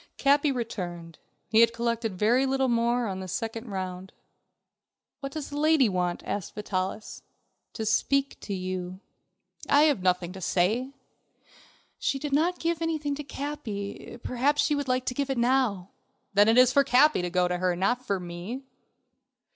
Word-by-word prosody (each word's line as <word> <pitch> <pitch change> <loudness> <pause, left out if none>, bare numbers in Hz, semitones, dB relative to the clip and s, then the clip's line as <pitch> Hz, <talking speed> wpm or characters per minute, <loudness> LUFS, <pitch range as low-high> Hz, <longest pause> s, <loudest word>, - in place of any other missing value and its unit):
Capi 285 +1 +3
returned. 175 - -5 0.3
He 220 - +3
had 230 0 +5
collected 230 -3 -2
very 240 +7 +3
little 265 0 +1
more 235 +1 +1
on 190 -3 -3
this 185 -2 -6
second 225 +1 -4
round. 185 -1 -5 1.1
"What 275 -1 -5
does 300 -1 -6
the 290 - -3
lady 310 -4 +4
want?" 180 -2 -1
asked 200 -4 -4
Vitalis. 200 0 -4 0.5
"To 220 - -4
speak 275 +5 +1
to - - -8
you." 185 0 -4 0.7
"I 290 +1 +6
have 290 -10 +3
nothing 180 -1 0
to 190 - -9
say." 220 +11 0 1.1
"She 275 - 0
did 280 +1 -4
not 340 +5 +2
give 335 0 -1
anything 310 -3 -1
to 295 +1 -5
Capi, 250 -8 -6
perhaps 285 +4 +1
she 300 - +1
would 285 -2 -2
like 255 0 0
to - - -1
give 280 +1 -2
it 270 - -1
now." 235 -7 +1 0.4
"Then 205 +1 +5
it 225 +2 +4
is 255 0 +6
for 280 - +5
Capi 275 -1 +4
to 180 - -2
go 180 0 +2
to 180 0 -2
her, 180 -1 +1
not 220 +8 0
for 200 -6 -1
me." 180 +9 -6
235 Hz, 170 wpm, -27 LUFS, 185-275 Hz, 1.1 s, I